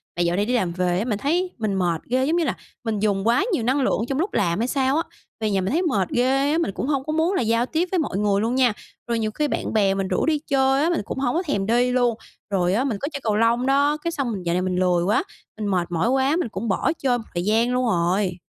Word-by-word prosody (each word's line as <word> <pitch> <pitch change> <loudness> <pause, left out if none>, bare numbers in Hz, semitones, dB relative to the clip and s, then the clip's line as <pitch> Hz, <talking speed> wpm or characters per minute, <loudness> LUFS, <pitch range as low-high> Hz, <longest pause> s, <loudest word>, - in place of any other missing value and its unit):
Mà 175 - -1
dạo 175 0 +1
này 200 +2 +1
đi 245 - -1
làm 185 -8 +1
về 180 0 0
á, 220 - -1
mình 215 -5 -1
thấy 355 - 0
mình 215 -4 -1
mệt 175 -4 0
ghê, 260 +1 +2
giống 315 +4 +1
như 340 - +2
là 265 - -1 0.3
mình 220 -3 -2
dùng 200 0 0
quá 240 +11 +3
nhiều 240 - 0
năng 265 +4 +1
lượng 255 - +1
trong 270 - -1
lúc 375 +5 -1
làm 175 -1 +1
hay 235 - 0
sao 265 +1 +1
á, 330 - +1 0.4
về 215 -1 -1
nhà 195 -1 +1
mình 190 - -2
thấy 335 +5 +1
mệt 210 - 0
ghê 270 +3 +2
á, 315 - +2
mình 330 -12 0
cũng 255 - -4
hông 275 -3 0
có 310 - -3
muốn 325 +4 +1
là - - +1
giao 230 +1 +1
tiếp 330 +6 -1
với 370 - +1
mọi 275 -11 -2
người 200 -1 +1
luôn 230 +3 0
nha. 250 -4 +3 0.3
Rồi 235 -1 0
nhiều 215 -1 -1
khi 300 +6 -1
bạn - - -3
bè 200 -3 +3
mình 195 -1 -2
rủ - - 0
đi 310 -2 +1
chơi 270 0 +2
á, 335 - +2
mình 345 - 0
cũng - - -5
hổng 255 0 0
có 355 - +1
thèm 200 - -1
đi 245 +3 +2
luôn, 245 -2 +2 0.3
rồi 180 -2 +1
á, 235 +6 +1
mình 245 -7 -1
có 280 - -1
chơi 280 - -3
cầu 215 -2 +1
lông 230 +3 +2
đó, 285 +2 +3
cái 335 +2 -3
xong 275 -7 -2
mình 190 -4 -5
dạo 170 - -1
này 180 - +1
mình 185 0 -1
lười 180 -1 +2
quá, 205 +4 +2 0.3
mình 215 -1 -3
mệt 180 -3 -1
mỏi 175 +7 +1
quá, 270 +3 +2
mình 335 -9 -1
cũng 210 +4 -5
bỏ 195 - +1
chơi 255 -3 +1
một 235 - -7
thời 175 0 -2
gian 225 +4 +2
luôn 250 0 +1
rồi. 180 -2 0
235 Hz, 300 wpm, -23 LUFS, 195-275 Hz, 0.4 s, quá